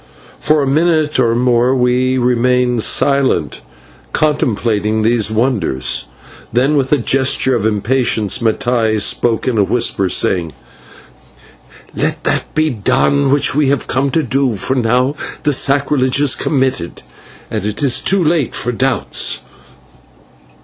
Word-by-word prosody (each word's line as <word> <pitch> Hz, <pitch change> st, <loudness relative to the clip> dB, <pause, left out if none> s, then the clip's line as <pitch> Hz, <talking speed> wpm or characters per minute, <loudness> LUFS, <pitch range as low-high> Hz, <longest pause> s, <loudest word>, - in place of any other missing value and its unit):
For 150 Hz, -1 st, +1 dB
a -, -, -2 dB
minute 155 Hz, 0 st, +1 dB
or 115 Hz, -2 st, +2 dB
more 125 Hz, +1 st, +2 dB
we 125 Hz, +1 st, +1 dB
remained 125 Hz, -1 st, +1 dB
silent, 135 Hz, -, +1 dB, 0.5 s
contemplating 110 Hz, -7 st, 0 dB
these 110 Hz, -1 st, +2 dB
wonders; 110 Hz, -, -1 dB, 0.5 s
then, 130 Hz, +6 st, +1 dB
with 135 Hz, -2 st, 0 dB
a 150 Hz, -, +4 dB
gesture 130 Hz, +1 st, +1 dB
of 110 Hz, -3 st, 0 dB
impatience, 110 Hz, 0 st, 0 dB
Mattai 115 Hz, -1 st, 0 dB
spoke 115 Hz, +4 st, 0 dB
in 120 Hz, -4 st, 0 dB
a -, -, +4 dB
whisper, 100 Hz, -3 st, 0 dB
saying: 85 Hz, -3 st, 0 dB, 1.4 s
"Let -, -, -2 dB
that -, -, -2 dB
be 155 Hz, 0 st, +1 dB
done 135 Hz, +5 st, +1 dB
which 145 Hz, 0 st, +2 dB
we 145 Hz, 0 st, +1 dB
have 140 Hz, -2 st, -1 dB
come 135 Hz, +2 st, -1 dB
to 160 Hz, +4 st, 0 dB
do, 130 Hz, -1 st, -1 dB
for 100 Hz, -, -2 dB
now 125 Hz, +3 st, 0 dB, 0.3 s
the 150 Hz, -1 st, +1 dB
sacrilege 135 Hz, -1 st, +1 dB
is 145 Hz, -2 st, +3 dB
committed 130 Hz, -, -2 dB, 0.5 s
and 110 Hz, -3 st, -3 dB
it 105 Hz, +6 st, -4 dB
is 135 Hz, -3 st, +2 dB
too 195 Hz, -2 st, +1 dB
late 155 Hz, -5 st, 0 dB
for 125 Hz, -, -2 dB
doubts." 130 Hz, +2 st, 0 dB
125 Hz, 135 wpm, -15 LUFS, 110-140 Hz, 1.4 s, a